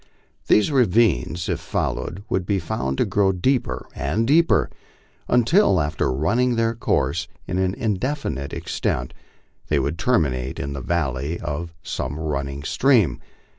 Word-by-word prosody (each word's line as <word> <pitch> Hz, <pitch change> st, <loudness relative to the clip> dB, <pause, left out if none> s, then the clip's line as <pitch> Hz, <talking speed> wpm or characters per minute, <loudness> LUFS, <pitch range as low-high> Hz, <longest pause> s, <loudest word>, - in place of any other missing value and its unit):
These 105 Hz, +8 st, +4 dB
ravines, 100 Hz, -, +2 dB
if -, -, -1 dB
followed, 100 Hz, +4 st, -3 dB
would 95 Hz, -, 0 dB
be 100 Hz, +2 st, 0 dB
found 65 Hz, -6 st, -2 dB
to -, -, +2 dB
grow 100 Hz, -1 st, +2 dB
deeper 125 Hz, +8 st, 0 dB
and 115 Hz, +2 st, -1 dB
deeper, 160 Hz, +6 st, +3 dB, 0.6 s
until, 125 Hz, -, +4 dB
after 75 Hz, -3 st, 0 dB
running 115 Hz, -, +1 dB
their 115 Hz, 0 st, +1 dB
course 115 Hz, -, 0 dB, 0.2 s
for -, -, -9 dB
an 95 Hz, +1 st, 0 dB
indefinite 105 Hz, -, -2 dB
extent, 60 Hz, 0 st, -2 dB, 0.5 s
they -, -, +1 dB
would 80 Hz, +4 st, -1 dB
terminate 70 Hz, -, 0 dB
in 70 Hz, 0 st, -3 dB
the 70 Hz, -, -5 dB
ynlley 75 Hz, +1 st, -1 dB
of 85 Hz, +1 st, -5 dB
some 75 Hz, -, -4 dB
running 70 Hz, -2 st, -3 dB
stream. 120 Hz, -, +3 dB
90 Hz, 135 wpm, -23 LUFS, 70-115 Hz, 0.6 s, These